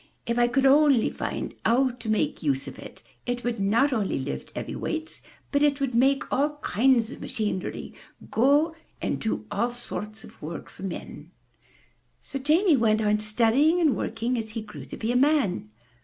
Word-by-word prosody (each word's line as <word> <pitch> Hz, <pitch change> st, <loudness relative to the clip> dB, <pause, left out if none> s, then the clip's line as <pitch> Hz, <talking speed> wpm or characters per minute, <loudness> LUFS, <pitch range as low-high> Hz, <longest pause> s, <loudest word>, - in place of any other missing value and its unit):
*'If 235 Hz, +1 st, 0 dB
I 240 Hz, -, +5 dB
could 265 Hz, +3 st, +1 dB
only 275 Hz, -3 st, +5 dB
find -, -, -4 dB
out 255 Hz, +3 st, +3 dB
how -, -, -14 dB
to 230 Hz, -2 st, -6 dB
make 215 Hz, -, 0 dB
use 135 Hz, -3 st, 0 dB
of -, -, -9 dB
it, -, -, -11 dB, 0.2 s
it 245 Hz, 0 st, -2 dB
would 240 Hz, -2 st, -2 dB
not 230 Hz, +8 st, +3 dB
only 210 Hz, -5 st, 0 dB
lift 130 Hz, -, -5 dB
heavy -, -, -4 dB
weights, 320 Hz, 0 st, -4 dB, 0.3 s
but 285 Hz, -, +2 dB
it 290 Hz, -1 st, +3 dB
would 270 Hz, -3 st, -1 dB
make 270 Hz, +4 st, +3 dB
all 295 Hz, +2 st, +1 dB
kinds 235 Hz, 0 st, +3 dB
of -, -, -10 dB
machinery 210 Hz, -5 st, -3 dB, 0.4 s
go, 290 Hz, +7 st, +3 dB, 0.2 s
and -, -, -2 dB
do 220 Hz, -1 st, -2 dB
all 215 Hz, +4 st, +1 dB
sorts 220 Hz, -3 st, -7 dB
of -, -, -15 dB
work 160 Hz, +2 st, -7 dB
for -, -, -15 dB
men/' 190 Hz, -3 st, -6 dB, 1.0 s
So 275 Hz, -, -5 dB
Jamie 310 Hz, +4 st, +4 dB
went 220 Hz, -2 st, +3 dB
on 210 Hz, 0 st, +2 dB
studying 235 Hz, +10 st, +3 dB
and 315 Hz, -6 st, +3 dB
working 235 Hz, +2 st, -2 dB
as 220 Hz, -1 st, -6 dB
he 225 Hz, -2 st, -4 dB
grew -, -, -10 dB
to -, -, -8 dB
be 225 Hz, +1 st, -1 dB
a -, -, -1 dB
man. 260 Hz, -, +2 dB
240 Hz, 185 wpm, -26 LUFS, 215-275 Hz, 1.0 s, I